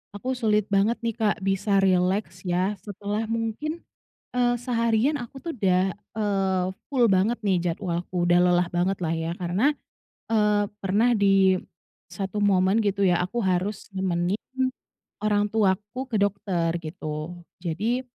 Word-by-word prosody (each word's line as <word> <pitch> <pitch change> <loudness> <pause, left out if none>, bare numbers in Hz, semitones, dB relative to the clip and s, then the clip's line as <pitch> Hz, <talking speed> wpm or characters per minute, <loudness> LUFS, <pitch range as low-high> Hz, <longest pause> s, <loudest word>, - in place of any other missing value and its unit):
Aku 255 +6 -3
sulit 215 -5 +2
banget 200 +4 +3
nih, 230 -2 -1
Kak, 215 -2 +2
bisa 195 +1 +2
rileks 185 0 +1
ya, 180 +3 +1
setelah 205 +2 -4
mungkin, 230 +9 -3 0.5
eee, 245 -1 +3
seharian 235 +2 +1
aku 270 0 -7
tuh 330 +2 -5
udah, 190 -3 +2
eee, 195 -3 -1 0.3
full 250 -4 +4
banget 200 +4 +2
nih 200 -4 +1
jadwalku, 175 -1 -2
udah 175 0 +5
lelah 180 0 +3
bangetlah 175 -1 -1
ya, 165 0 -2
karena, 185 +11 +2 0.6
eee, 210 -2 +3 0.2
pernah 215 +6 +3
di 195 -2 +4 0.6
satu 195 +3 -3
momen 195 +2 +3
gitu 200 -1 +2
ya, 180 0 +3
aku 210 +7 -3
harus 190 0 -1
nemenin 180 0 0 0.9
orang 205 -1 +2
tuaku 210 +3 0
ke 215 - +1
dokter 190 -4 0
gitu. 155 +1 -6 0.2
Jadi, 220 +10 -1
200 Hz, 135 wpm, -25 LUFS, 185-220 Hz, 0.9 s, udah